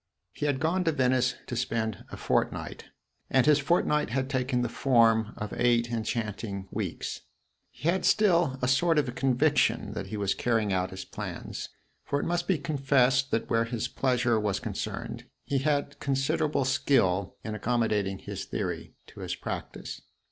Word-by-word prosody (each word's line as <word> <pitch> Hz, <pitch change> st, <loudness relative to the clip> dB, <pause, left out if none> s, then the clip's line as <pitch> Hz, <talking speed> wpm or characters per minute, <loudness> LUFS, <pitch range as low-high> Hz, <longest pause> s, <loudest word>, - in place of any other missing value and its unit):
He 150 Hz, -, -2 dB
had 140 Hz, -2 st, 0 dB
gone 170 Hz, +4 st, +1 dB
to 165 Hz, -, +3 dB
Venice 130 Hz, -3 st, +2 dB
to 120 Hz, -, -5 dB
spend 115 Hz, -4 st, -2 dB
a -, -, -8 dB
fortnight, -, -, -1 dB, 0.4 s
and 130 Hz, -2 st, +4 dB
his 150 Hz, -1 st, +5 dB
fortnight 150 Hz, 0 st, +2 dB
had 130 Hz, +3 st, -1 dB
taken 130 Hz, -2 st, 0 dB
the -, -, +1 dB
form 115 Hz, -3 st, +3 dB
of 105 Hz, -2 st, -5 dB
eight 120 Hz, -1 st, +2 dB
enchanting 110 Hz, -3 st, -3 dB
weeks. -, -, -4 dB, 0.5 s
He 150 Hz, -, -6 dB
had 185 Hz, +2 st, +2 dB
still 175 Hz, -10 st, +3 dB
a -, -, +3 dB
sort 160 Hz, +5 st, +3 dB
of 135 Hz, -5 st, +1 dB
conviction 135 Hz, +3 st, +2 dB
that -, -, -5 dB
he 110 Hz, -, -5 dB
was 100 Hz, -1 st, +1 dB
carrying 110 Hz, -4 st, +1 dB
out 95 Hz, 0 st, 0 dB
his 95 Hz, 0 st, -7 dB
plans; -, -, -6 dB, 0.3 s
for 140 Hz, -, -1 dB
it -, -, -2 dB
must 175 Hz, 0 st, -1 dB
be 185 Hz, -, +3 dB
confessed 135 Hz, -2 st, +2 dB
that 115 Hz, -, 0 dB
where 115 Hz, 0 st, +2 dB
his 115 Hz, 0 st, -2 dB
pleasure 120 Hz, -3 st, +1 dB
was 105 Hz, -2 st, 0 dB
concerned -, -, -5 dB, 0.2 s
he 140 Hz, -, 0 dB
had 145 Hz, 0 st, 0 dB
considerable 140 Hz, +1 st, 0 dB
skill 100 Hz, -9 st, +2 dB
in 110 Hz, -, -4 dB
accommodating 110 Hz, -4 st, 0 dB
his 100 Hz, 0 st, -6 dB
theory 85 Hz, -5 st, -4 dB
to -, -, -14 dB
his -, -, -3 dB
practice. -, -, -6 dB
125 Hz, 165 wpm, -28 LUFS, 110-140 Hz, 0.5 s, his